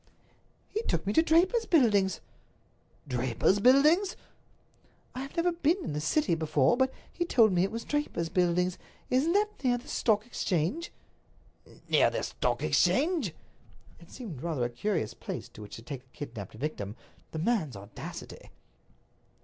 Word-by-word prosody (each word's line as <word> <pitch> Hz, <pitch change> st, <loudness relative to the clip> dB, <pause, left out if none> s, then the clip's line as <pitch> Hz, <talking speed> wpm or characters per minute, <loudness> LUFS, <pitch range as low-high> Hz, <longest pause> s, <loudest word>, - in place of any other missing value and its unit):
"He 435 Hz, -, -1 dB
took 170 Hz, -, -1 dB
me 200 Hz, -, 0 dB
to 320 Hz, -, +6 dB
Draper's 365 Hz, +8 st, +3 dB
Buildings." 205 Hz, -, +3 dB, 0.9 s
"Draper's 125 Hz, -, +1 dB
Buildings?" 300 Hz, -, +5 dB, 1.0 s
"I 255 Hz, -, -6 dB
have 275 Hz, +4 st, -8 dB
never 345 Hz, +1 st, +3 dB
been 335 Hz, 0 st, +2 dB
in 150 Hz, -, -4 dB
the 150 Hz, -, -2 dB
City 195 Hz, -, +1 dB
before, 155 Hz, -, +2 dB
but 260 Hz, +1 st, +2 dB, 0.2 s
he 345 Hz, -, -1 dB
told 230 Hz, -, +4 dB
me 175 Hz, -, +3 dB
it 195 Hz, -, +1 dB
was 230 Hz, +1 st, -5 dB
Draper's 295 Hz, -, -2 dB
Buildings. 180 Hz, 0 st, +1 dB, 0.3 s
Isn't 275 Hz, +7 st, +3 dB
that 420 Hz, -4 st, 0 dB
near 245 Hz, -2 st, +3 dB
the 240 Hz, -, -12 dB
Stock 215 Hz, -1 st, +1 dB
Exchange?" 215 Hz, -, -1 dB, 1.0 s
"Near -, -, +4 dB
the -, -, -3 dB
Stock -, -, -1 dB
Exchange?" 280 Hz, -, +2 dB, 0.6 s
It 170 Hz, -, -16 dB
seemed 200 Hz, -, -8 dB
rather 155 Hz, -8 st, -1 dB
a -, -, -1 dB
curious 160 Hz, -, -1 dB
place -, -, -6 dB
to -, -, -13 dB
which 105 Hz, -, -9 dB
to 115 Hz, -, -10 dB
take 130 Hz, +1 st, -6 dB
a 130 Hz, 0 st, -27 dB
kidnaped 115 Hz, -9 st, -7 dB
victim. 110 Hz, -6 st, -4 dB, 0.4 s
The -, -, -5 dB
man's 165 Hz, -, 0 dB
audacity! 100 Hz, +1 st, -9 dB
205 Hz, 155 wpm, -29 LUFS, -, 1.0 s, to